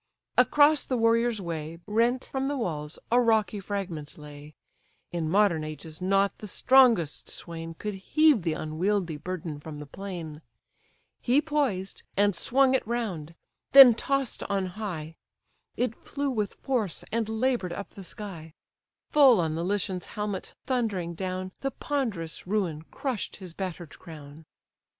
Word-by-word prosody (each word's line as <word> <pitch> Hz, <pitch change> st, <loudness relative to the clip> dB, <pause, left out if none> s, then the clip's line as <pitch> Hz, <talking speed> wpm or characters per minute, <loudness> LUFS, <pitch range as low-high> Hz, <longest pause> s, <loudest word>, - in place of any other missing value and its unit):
Across 295 Hz, +1 st, +5 dB
the 255 Hz, -, -1 dB
warrior's 230 Hz, 0 st, +3 dB
way, 165 Hz, -3 st, -5 dB
Rent 235 Hz, +4 st, +1 dB
from 270 Hz, 0 st, -2 dB
the 285 Hz, 0 st, -1 dB
walls, 155 Hz, -, -3 dB
a 245 Hz, +1 st, +5 dB
rocky 220 Hz, -4 st, +2 dB
fragment 185 Hz, -7 st, -5 dB
lay; 150 Hz, 0 st, -11 dB, 0.6 s
In 165 Hz, -2 st, -2 dB
modern 190 Hz, -4 st, +3 dB
ages 155 Hz, +2 st, -8 dB
not 195 Hz, +1 st, +2 dB
the 210 Hz, -, -7 dB
strongest 235 Hz, -, +4 dB
swain 165 Hz, -1 st, -5 dB
Could 210 Hz, +5 st, -4 dB
heave 285 Hz, +6 st, +3 dB
the 165 Hz, -2 st, 0 dB
unwieldy 170 Hz, +3 st, -1 dB
burden 165 Hz, -2 st, -5 dB
from 150 Hz, 0 st, -8 dB
the 150 Hz, -, -7 dB
plain: 165 Hz, -2 st, -7 dB, 0.8 s
He 255 Hz, +4 st, +3 dB
poised, 280 Hz, -12 st, -1 dB, 0.2 s
and 205 Hz, -1 st, +3 dB
swung 265 Hz, +7 st, +3 dB
it 260 Hz, -, +1 dB
round; 190 Hz, -10 st, -3 dB, 0.4 s
then 270 Hz, -3 st, +11 dB
toss'd 275 Hz, +2 st, -1 dB
on 195 Hz, -1 st, 0 dB
high, 165 Hz, -7 st, -5 dB, 0.6 s
It 245 Hz, -2 st, 0 dB
flew 280 Hz, +3 st, -3 dB
with 210 Hz, -5 st, -2 dB
force, 230 Hz, -10 st, -2 dB
and 225 Hz, -1 st, -1 dB
labour'd 220 Hz, -4 st, 0 dB
up 200 Hz, +3 st, -6 dB
the 195 Hz, -, -10 dB
sky; 170 Hz, -5 st, -9 dB, 0.6 s
Full 270 Hz, -7 st, +7 dB
on 160 Hz, -2 st, 0 dB
the 165 Hz, +1 st, -2 dB
Lycian's 190 Hz, -1 st, -1 dB
helmet 210 Hz, -2 st, -4 dB
thundering 210 Hz, -10 st, -1 dB
down, 185 Hz, +1 st, -4 dB
The 275 Hz, -, 0 dB
ponderous 225 Hz, -, -3 dB
ruin 185 Hz, -7 st, -1 dB
crush'd 260 Hz, -7 st, -3 dB
his 185 Hz, -4 st, -9 dB
batter'd 175 Hz, -4 st, -6 dB
crown. 155 Hz, -2 st, -11 dB
195 Hz, 145 wpm, -27 LUFS, 165-235 Hz, 0.8 s, then